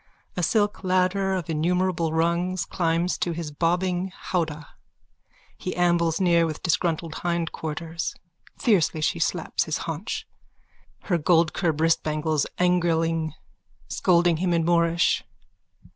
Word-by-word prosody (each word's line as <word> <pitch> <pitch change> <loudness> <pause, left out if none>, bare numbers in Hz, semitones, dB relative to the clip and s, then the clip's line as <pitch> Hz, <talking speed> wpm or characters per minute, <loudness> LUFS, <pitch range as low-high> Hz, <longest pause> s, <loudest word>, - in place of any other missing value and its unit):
A 180 - -1
silk 205 +4 +1
ladder 185 +1 +1
of 180 -4 -3
innumerable 170 +1 0
rungs 170 +2 0
climbs 170 0 0
to 175 - -1
his 165 -2 -5
bobbing 180 +4 0
howdah. 155 -4 -3 0.9
He 185 - -4
ambles 170 -2 +2
near 170 -3 +3
with 155 -1 -6
disgruntled 165 -2 0
hindquarters. 165 -1 -3 0.4
Fiercely 180 - +2
she 155 - 0
slaps 170 +1 0
his 155 - -1
haunch, 210 - -4 0.8
her 175 -3 0
goldcurb 165 0 +2
wristbangles 155 -2 +1
angriling, 165 -3 +1 0.6
scolding 175 -2 +3
him 175 +1 0
in 165 -1 +1
Moorish.) 170 0 +2
170 Hz, 115 wpm, -25 LUFS, 160-180 Hz, 0.9 s, near